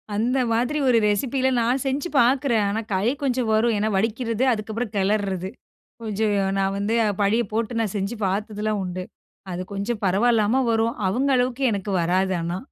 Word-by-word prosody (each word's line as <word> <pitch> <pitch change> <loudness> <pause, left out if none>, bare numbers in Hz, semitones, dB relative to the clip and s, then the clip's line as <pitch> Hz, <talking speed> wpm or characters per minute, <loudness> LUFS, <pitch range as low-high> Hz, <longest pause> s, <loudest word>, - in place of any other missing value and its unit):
அந்த 240 +5 +1 0.2
மாதிரி 245 +6 0
ஒரு 245 -2 +5
ரெசிப்பில 260 +5 0
நான் 245 +3 +1
செஞ்சு 275 +6 -1
பார்க்கிறேன். 245 -2 +3
ஆனா, 210 +2 -1
கை 190 +3 +1 0.2
கொஞ்சம் 255 -4 0
வரும். 225 +2 +3
ஏன்னா, 215 +1 0
வடிக்கிறது 230 +3 -1
அதுக்கப்புறம், 220 +1 -4
கெளர்றது. 195 -2 0 0.5
கொஞ்சம் 215 -1 0 0.2
நான் 195 0 0
வந்து 205 +3 -1 0.3
பழிய 215 +4 +2
போட்டு, 230 +1 -1
நான் 220 -3 -2
செஞ்சு 200 +4 -2
பார்த்ததுலாம் 210 +2 -2
உண்டு. 180 0 -5 0.5
அது 180 +1 -3
கொஞ்சம் 205 +3 -3
பரவாயில்லாம 220 +5 +2
வரும். 225 0 +1
அவுங்க 260 +9 0
அளவுக்கு 250 +1 0
எனக்கு 200 0 -3
வராது 185 +3 +1
ஆனா. 170 +2 -3
220 Hz, 155 wpm, -23 LUFS, 200-240 Hz, 0.5 s, ஒரு